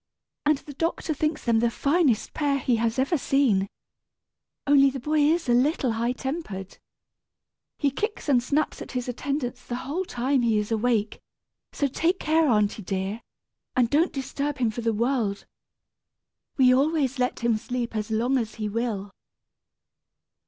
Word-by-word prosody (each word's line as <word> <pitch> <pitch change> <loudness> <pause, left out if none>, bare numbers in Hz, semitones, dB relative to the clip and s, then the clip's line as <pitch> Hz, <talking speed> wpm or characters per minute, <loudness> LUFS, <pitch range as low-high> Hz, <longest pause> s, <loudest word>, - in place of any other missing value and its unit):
"And 300 -1 +4
the 290 - -11
doctor 325 +2 -1
thinks 305 +1 -2
them 230 -2 +3
the 235 +1 +2
finest 280 -1 +1
pair 285 -2 +1
he 245 -3 +1
has 225 +1 0
ever 280 +5 +1
seen. 245 -10 +2 1.0
Only 275 -1 +6
the 270 0 -5
boy 305 +4 0
is 315 +2 +2
a 240 - +3
little 255 0 +2
high 235 +2 0
tempered. 255 - -5 1.0
He 285 -2 +1
kicks 425 - -3
and 260 -4 +4
snaps 290 +5 -1
at - - -8
his 250 -1 -3
attendants 250 -1 -3
the 240 - -5
whole 315 +8 -2
time 260 -3 0
he 230 -2 +2
is 210 +1 -2
awake; 220 -1 0 0.5
so 285 - -1
take 330 +7 0
care, 320 0 +2
aunty 210 -3 +2
dear, 195 +3 -3 0.5
and 245 -3 +2
don't 320 +5 +3
disturb 280 +1 -3
him 240 -4 +1
for 240 - -5
the 230 0 +1
world. 225 -2 -1 1.1
We 255 -2 +6
always 275 -1 +1
let 250 -1 0
him 235 -1 +2
sleep 240 0 -4
as 215 0 -2
long 240 +4 +1
as 220 -2 -4
he 215 -2 -3
will." 210 -2 -3
255 Hz, 160 wpm, -25 LUFS, 230-285 Hz, 1.1 s, Only